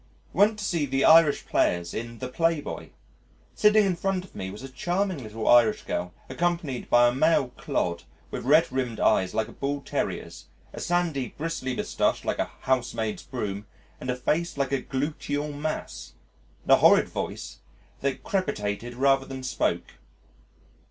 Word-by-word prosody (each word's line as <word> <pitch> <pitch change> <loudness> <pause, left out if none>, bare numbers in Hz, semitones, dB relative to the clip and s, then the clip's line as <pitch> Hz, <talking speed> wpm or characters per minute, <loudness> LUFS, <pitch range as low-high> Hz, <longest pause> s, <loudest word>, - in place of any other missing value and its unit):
Went 210 +2 +4
to 210 - -4
see 165 -7 0
the 135 +1 +1
Irish 160 -2 +6
Players 85 -1 +1
in 115 +1 -5
The 130 - -5
Playboy. 165 +3 -1 0.6
Sitting 210 0 +5
in 190 -2 +1
front 185 +1 -1
of - - -19
me 95 - -5
was 105 +6 -9
a - - -5
charming 175 +5 -1
little 110 -1 -5
Irish 120 -3 +5
girl 90 0 -3 0.2
accompanied 170 -7 -2
by 120 0 +6
a 120 - +1
male 135 -1 +3
clod 85 -7 -2 0.3
with - - -4
red 150 +5 +4
rimmed 125 -3 -2
eyes 95 -3 +2
like 110 -1 0
a - - -11
Bull 140 +1 -3
terrier's, - - -4 0.3
a - - -7
sandy, 170 -7 -1
bristly 145 -5 -3
moustache - - 0
like - - -1
a - - 0
housemaid's 120 -4 -1
broom, 105 -5 -5 0.3
and 125 - -6
a 125 - +1
face 155 +6 -1
like 140 -1 0
a 135 -2 0
gluteal 145 +2 -3
mass, 155 +2 -5 0.5
and - - -1
a - - +10
horrid - - +6
voice - - -5 0.4
that 140 -1 -2
crepitated 120 - -2
rather 135 +1 +3
than 130 -1 -7
spoke. 130 - -2
135 Hz, 165 wpm, -26 LUFS, 120-165 Hz, 0.6 s, a